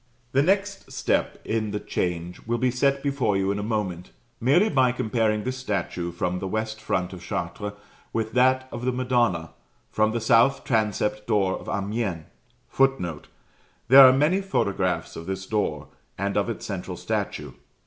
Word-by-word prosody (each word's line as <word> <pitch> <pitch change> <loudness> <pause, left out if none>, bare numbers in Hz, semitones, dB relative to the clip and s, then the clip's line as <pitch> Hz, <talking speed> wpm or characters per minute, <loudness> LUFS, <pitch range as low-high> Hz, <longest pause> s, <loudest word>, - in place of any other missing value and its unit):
The 135 - +3
next 195 +4 0
step - - 0
in 110 -1 -1
the 105 0 -3
change 90 -3 -3
will 120 +1 0
be 125 +1 +1
set 140 +2 +1
before 135 -8 +1
you 95 0 +1
in 100 - -2
a - - -2
moment, 100 -5 -3 0.3
merely 145 - +4
by 130 - +3
comparing 110 -3 0
this 130 +2 -3
statue 95 -7 -3
from 90 +1 -2
the 95 - -4
west 110 +2 -3
front 90 -3 -1
of 90 - -9
Chartres 100 +4 -4 0.4
with 110 -1 -2
that 130 +1 +3
of 120 - -6
the 130 - +1
Madonna, 120 -10 0 0.4
from 110 0 +2
the 115 - -1
south 115 +4 +4
transept 105 -2 0
door 95 -3 +2
of - - -6
Amiens. 100 -4 -2 0.4
[Footnote: 135 - 0 0.6
There 135 +2 +10
are 130 - +9
many 150 +9 +2
photographs 100 - -1
of 85 - -8
this 95 0 -4
door 105 0 -2 0.3
and 100 +1 -2
of - - +1
its - - -5
central - - -5
statue. - - -3
110 Hz, 170 wpm, -25 LUFS, 95-130 Hz, 0.6 s, There